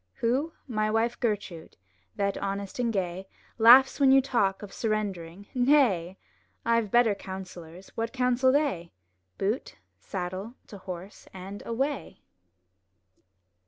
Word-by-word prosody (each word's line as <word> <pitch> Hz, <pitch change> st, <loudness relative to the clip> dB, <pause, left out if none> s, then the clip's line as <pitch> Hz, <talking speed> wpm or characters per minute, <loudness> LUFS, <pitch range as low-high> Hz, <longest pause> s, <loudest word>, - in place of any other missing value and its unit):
*' 90 Hz, -, -49 dB
Who? 270 Hz, +8 st, 0 dB
My 215 Hz, -4 st, 0 dB
wife 225 Hz, +2 st, 0 dB
Gertrude; 205 Hz, -7 st, -3 dB, 0.4 s
that, 200 Hz, -1 st, 0 dB
honest 200 Hz, +2 st, -4 dB
and 240 Hz, -2 st, +1 dB
gay. 190 Hz, -2 st, -3 dB, 0.3 s
Laughs 255 Hz, +5 st, +7 dB
when 275 Hz, -2 st, +5 dB
you 270 Hz, -, +7 dB
talk 210 Hz, -8 st, 0 dB
of 200 Hz, -, -9 dB
surrendering, 200 Hz, -4 st, -3 dB
''Nay! 245 Hz, -, +3 dB, 0.5 s
I've 230 Hz, -2 st, +2 dB
better 240 Hz, -1 st, +4 dB
counsellors; 185 Hz, -2 st, -9 dB
what 230 Hz, 0 st, -4 dB
counsel 255 Hz, 0 st, +2 dB
they? 265 Hz, -, 0 dB, 0.4 s
Boot, 210 Hz, +7 st, -2 dB, 0.2 s
saddle, 190 Hz, +4 st, -5 dB
to 200 Hz, -, -10 dB
horse, 185 Hz, +1 st, -9 dB
and 190 Hz, +2 st, -8 dB
away!'' 270 Hz, +5 st, -3 dB
215 Hz, 125 wpm, -27 LUFS, 190-245 Hz, 0.5 s, Laughs